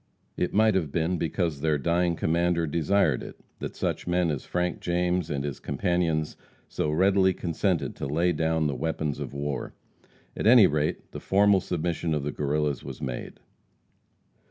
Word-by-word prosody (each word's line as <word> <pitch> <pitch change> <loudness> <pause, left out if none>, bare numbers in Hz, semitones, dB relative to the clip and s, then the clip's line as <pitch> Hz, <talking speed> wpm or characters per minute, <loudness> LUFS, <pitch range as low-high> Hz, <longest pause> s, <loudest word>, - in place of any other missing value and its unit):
It 90 - -1
might 110 +1 +4
have 85 -7 0
been 85 +2 0
because 80 -3 -1
their 80 -1 +2
dying 85 +3 +1
commander 85 +1 +1
desired 80 -1 +1
it, - - -10 0.2
that - - -5
such - - -2
men 90 -1 +1
as 70 - -4
Frank 90 -1 -1
James 90 -1 0
and 70 -2 -2
his 70 -3 -4
companions 80 -1 -1 0.3
so 75 - -2
readily 95 +3 +3
consented 90 +1 -1
to - - -4
lay 85 +5 +1
down 80 -1 0
the 75 - 0
weapons 75 +1 -2
of - - -5
war. 70 0 -4 0.6
At - - -1
any 115 -3 +8
rate, 75 -2 -1
the - - -6
formal 100 0 +4
submission 85 -2 -2
of 75 - -2
the 75 - -2
Guerrillas 75 -2 -1
was - - -8
made. 60 -2 -6
85 Hz, 165 wpm, -27 LUFS, 75-90 Hz, 0.6 s, any